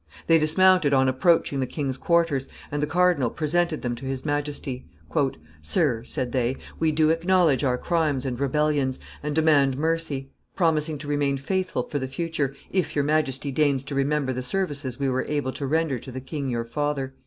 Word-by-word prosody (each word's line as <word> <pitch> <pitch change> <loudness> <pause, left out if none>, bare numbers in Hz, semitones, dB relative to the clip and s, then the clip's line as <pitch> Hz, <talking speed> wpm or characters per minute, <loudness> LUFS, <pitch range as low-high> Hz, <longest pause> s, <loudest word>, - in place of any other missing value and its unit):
They 165 -1 +5
dismounted 160 -1 +4
on 130 0 +4
approaching 140 +1 +2
the 130 - 0
king's 135 -2 -2
quarters, 165 -2 +1 0.2
and 145 0 -1
the 150 - 0
cardinal 175 -6 +2
presented 160 +2 0
them 120 -1 -1
to 135 - -8
his 135 +1 -4
Majesty. 145 -3 -3 0.7
"Sir," 115 - +1
said 125 0 -3
they, 125 0 0 0.2
"we 160 -1 +2
do 155 +1 +3
acknowledge 165 -4 +3
our 125 -2 +2
crimes 155 -4 0
and 125 -2 -3
rebellions, 140 -1 +1 0.2
and 150 0 -3
demand 145 -4 +4
mercy; 155 -3 -1 0.2
promising 155 -3 +1
to 145 0 -9
remain 145 -1 +1
faithful 185 -2 -1
for 145 +3 -3
the 130 - -3
future, 145 -1 -2 0.2
if 185 -2 -1
your 145 - +2
Majesty 145 -2 0
deigns 140 -2 +2
to 140 - -6
remember 140 -1 0
the 130 - -3
services 140 -4 -2
we 140 - 0
were 130 0 0
able 145 -3 -1
to 140 - -4
render 155 -3 0
to 130 - -9
the 130 - -5
king 135 +1 -4
your 115 -1 -2
father." 140 +1 -2
145 Hz, 185 wpm, -25 LUFS, 130-160 Hz, 0.7 s, They